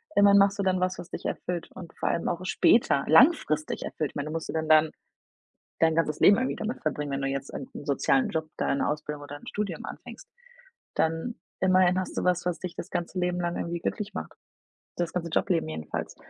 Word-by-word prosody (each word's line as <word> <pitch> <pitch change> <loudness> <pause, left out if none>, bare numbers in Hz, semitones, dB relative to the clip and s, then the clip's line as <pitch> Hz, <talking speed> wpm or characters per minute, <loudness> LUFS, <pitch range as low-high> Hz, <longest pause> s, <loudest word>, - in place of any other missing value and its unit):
Immerhin 200 0 +7
machst 200 +2 +4
du - - +1
dann 185 -1 +2
was, 185 0 0
was 175 - -8
dich - - -6
erfüllt 175 -2 -3
und 170 -3 -10
vor - - 0
allem 170 - -1
auch 175 +1 -3
später 185 -7 +3
langfristig 160 - +4
erfüllt. 150 -3 -3
Ich - - -39
meine, 145 0 -3
du 155 - -5
musst 165 - -4
du - - -3
dann 160 -1 -1
dein 155 0 +5 0.9
dein 160 -1 +3
ganzes 155 -2 0
Leben 200 - +7
irgendwie 255 +1 -1
damit 220 +3 -4
verbringen, 150 -2 -2
wenn 135 0 -2
du 135 - 0
jetzt 135 0 -4
einen 135 - -6 0.2
sozialen 135 -1 +2
Job, 160 -1 -2
deine 140 - 0
Ausbildung 150 -1 -4
oder 145 0 -8
'n - - -15
Studium 200 -5 -3
anfängst. - - -10 0.7
Dann 165 +9 0 0.3
immerhin 185 -1 +4
hast 185 - -5
du - - 0
was, 180 -1 +1
was 180 -1 -1
dich 180 -2 -6
das 180 - -7
ganze 175 +1 -3
Leben 180 0 0
lang 175 0 -1
irgendwie 170 0 -3
glücklich 210 +4 -3
macht. - - -6 0.6
Das 175 -1 -2
ganze 175 -2 -2
Job 180 - +1
Leben 165 -3 +1
jedenfalls. 80 0 -5
170 Hz, 215 wpm, -27 LUFS, 155-185 Hz, 0.9 s, Immerhin